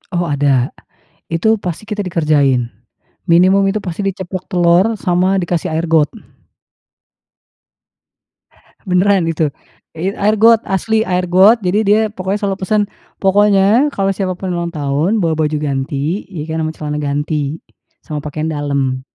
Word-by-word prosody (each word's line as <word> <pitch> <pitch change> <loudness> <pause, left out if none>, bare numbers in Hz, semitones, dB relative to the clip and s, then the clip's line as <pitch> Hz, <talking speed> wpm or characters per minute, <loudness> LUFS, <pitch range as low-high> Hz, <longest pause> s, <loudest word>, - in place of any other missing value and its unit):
Oh, 175 - +1
ada. 140 -4 +1 0.6
Itu, 195 +7 +2
pasti 180 +4 -5
kita 210 -2 -3
dikerjain, 150 -8 +1 0.6
minimum 185 +4 +4
itu 210 +2 0
pasti 185 +2 -4
diceplok 185 -1 -4
telur 175 +2 +3
sama 180 +1 +1
dikasih 175 -2 -2
air 165 +1 -1
got. 155 -2 +3 2.8
Benaran 185 0 +2
itu 160 -2 0 0.5
it 190 +4 -2
air 210 +2 +1
got 230 +1 +5
asli 220 +4 0
air 180 -4 0
got, 190 +6 +5
jadi 185 +4 +2
dia 210 +1 +3
pokoknya 190 +1 -2
selalu 195 -1 -1
pesan, 210 +3 +1 0.4
"Pokoknya 205 +6 +3
kalau 195 -7 -1
siapapun 185 -1 -3
ulang 170 0 -2
tahun 155 +6 -1
bawa 165 -5 +1
baju 155 -1 0
ganti," 145 +4 -2
ya 160 -6 -6
kan, 160 0 -3
"Ama 155 - -1
celana 150 -1 -4
ganti, 145 +1 -2 0.5
sama 150 -1 -5
pakaian 150 +1 -4
dalam, 140 -4 -1
175 Hz, 140 wpm, -16 LUFS, 150-195 Hz, 2.8 s, got